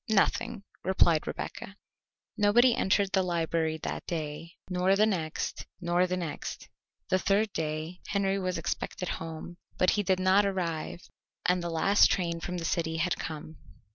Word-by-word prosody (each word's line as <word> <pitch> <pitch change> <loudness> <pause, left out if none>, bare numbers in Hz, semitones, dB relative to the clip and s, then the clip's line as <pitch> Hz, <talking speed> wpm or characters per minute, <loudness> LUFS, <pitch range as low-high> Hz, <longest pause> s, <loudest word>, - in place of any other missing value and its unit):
"Nothing," 205 -1 +1 0.2
replied 170 -4 +3
Rebecca. - - -6 0.6
Nobody 235 +4 +5
entered 195 0 +2
the 190 - +3
library 165 -2 0
that - - -4
day, 160 +1 -4
nor 185 +1 +2
the 210 +2 +5
next, 170 -7 -2
nor 175 0 +2
the 180 0 -1
next. 170 -4 -5 0.4
The 185 - +3
third 200 +2 +1
day 155 +2 -3
Henry 195 -1 +1
was 185 -2 -1
expected 175 +2 -3
home, 165 +1 -7 0.2
but 185 - +4
he 210 - +1
did 190 -2 +1
not 190 +2 +5
arrive 175 -4 -2 0.4
and 180 0 +3
the 170 - -3
last 170 +5 +4
train 170 -3 0
from 180 +1 -4
the 165 - -4
city 160 -1 0
had 170 +2 +1
come. 155 0 -6
180 Hz, 155 wpm, -29 LUFS, 165-195 Hz, 0.6 s, Nobody